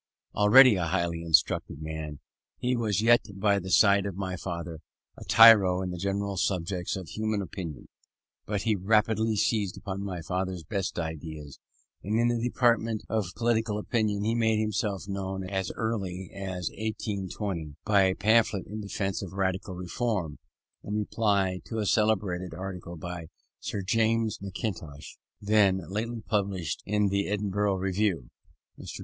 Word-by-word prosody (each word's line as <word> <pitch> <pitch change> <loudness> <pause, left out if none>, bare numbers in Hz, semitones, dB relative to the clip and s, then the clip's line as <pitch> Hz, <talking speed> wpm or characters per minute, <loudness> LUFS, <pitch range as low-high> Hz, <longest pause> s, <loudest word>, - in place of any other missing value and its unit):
Already 110 +2 +7
a 85 -2 -1
highly 85 -1 -1
instructed 80 -3 +2
man, 80 -1 -6 0.4
he 125 +1 0
was 110 -3 0
yet, 120 +1 +6
by 100 0 +2
the 95 0 -7
side 100 0 +5
of 100 - -5
my 95 -2 -3
father, 85 -3 -5 0.4
a - - -10
tyro 100 -5 +7
in 90 - -3
the 90 - -6
great 100 +1 -2
subjects 90 -1 -1
of 95 -4 -7
human 110 -1 -1
opinion; 90 -7 -6 0.6
but 105 -1 -2
he 110 -2 +2
rapidly 110 +3 +2
seized 105 -2 0
on 100 -1 -4
my 90 -4 -5
father's 90 0 -3
best 100 +1 -3
ideas; 80 -3 -6 0.4
and 105 +4 0
in 120 0 +3
the 115 - -2
department 115 -3 +1
of 105 -5 -2
political 115 -2 0
opinion 105 -2 -1
he 110 +2 +1
made 110 -2 +2
himself 105 -2 -2
known 95 -1 -4
as 95 -1 -2
early 95 -5 -3
as 95 -2 -4
1820, 100 -7 -4
by 105 -2 +4
a 95 0 +1
pamphlet 110 -2 +2
in 105 +1 -6
defence 100 -1 -3
of 95 -3 -7
Radical 95 -1 -2
Reform, 90 -3 -3 0.4
in 105 - -4
reply 100 -3 0
to 115 - -5
a 110 - 0
celebrated 95 -5 +1
article 90 -2 -7
by 85 0 -6 0.3
Sir 100 - -4
James 115 +1 +1
Mackintosh, 95 -7 -6 0.2
then 100 -2 +3
lately 115 +3 -3
published 100 -6 -2
in 105 -1 +1
he 100 0 0
Edinburgh 105 0 0
Review. 95 - -1 0.5
Mr. - - -8
100 Hz, 150 wpm, -28 LUFS, 90-110 Hz, 0.6 s, Already